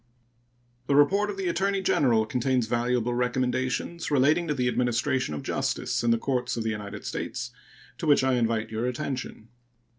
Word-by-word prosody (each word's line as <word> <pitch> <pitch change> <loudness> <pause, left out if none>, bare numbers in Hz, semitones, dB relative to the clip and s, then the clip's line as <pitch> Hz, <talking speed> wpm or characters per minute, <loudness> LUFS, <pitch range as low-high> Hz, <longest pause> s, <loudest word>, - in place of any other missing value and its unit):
The 140 - +2
report 195 +9 +4
of 200 - -5
the 190 -2 -2
Attorney 195 +3 +1
General 120 -11 +2
contains 125 +1 0
valuable 120 +1 0
recommendations 130 +6 -1
relating 150 +4 +3
to 150 - +1
the 125 -2 0
administration 125 - 0
of - - -6
justice - - -1
in 120 - +2
the 115 - +4
courts 125 0 -1
of 115 - -1
the 110 - -1
United 105 -2 -6
States, - - -4 0.5
to - - -3
which 145 -3 +5
I 130 0 +2
invite 115 -2 0
your 110 +2 -1
attention. 125 -3 -5
125 Hz, 170 wpm, -27 LUFS, 120-145 Hz, 0.5 s, which